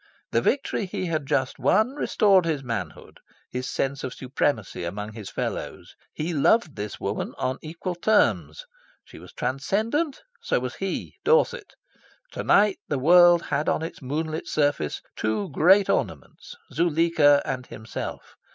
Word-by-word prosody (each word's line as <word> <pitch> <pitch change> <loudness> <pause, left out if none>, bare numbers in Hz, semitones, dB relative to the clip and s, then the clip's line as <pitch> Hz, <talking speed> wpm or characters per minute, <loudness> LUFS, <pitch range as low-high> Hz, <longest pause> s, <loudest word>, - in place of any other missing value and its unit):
The - - +2
victory 260 -7 0
he 185 - -4
had 155 -5 -2
just 130 -1 0
won 220 +6 +3
restored 200 - +3
his 155 -4 -1
manhood, 115 -9 -6 0.3
his 125 +1 -4
sense 135 0 -2
of 130 - -5
supremacy 125 -7 -2
among 105 +5 -5
his 105 -3 -8
fellows. - - -5 0.2
He 165 +3 -3
loved 155 +2 +2
this 105 -1 -6
woman - - -3
on 130 0 -2
equal 165 +3 -5
terms. 215 - +1 0.4
She - - -13
was - - -13
transcendent? 220 - -1 0.2
So 470 - 0
was - - -4
he, - - -4
Dorset. 485 +1 +2 0.6
To - - -5
night 205 -1 +4
the 145 - -1
world 175 +4 +6
had 150 +3 -1
on - - 0
its 165 - -7
moonlit 155 +4 -3
surface 145 - 0
two 110 +3 -2
great 185 +8 +5
ornaments - - -3 0.2
Zuleika 165 -3 +3
and 130 -4 -4
himself. 110 +1 -7
155 Hz, 145 wpm, -25 LUFS, 130-185 Hz, 0.6 s, world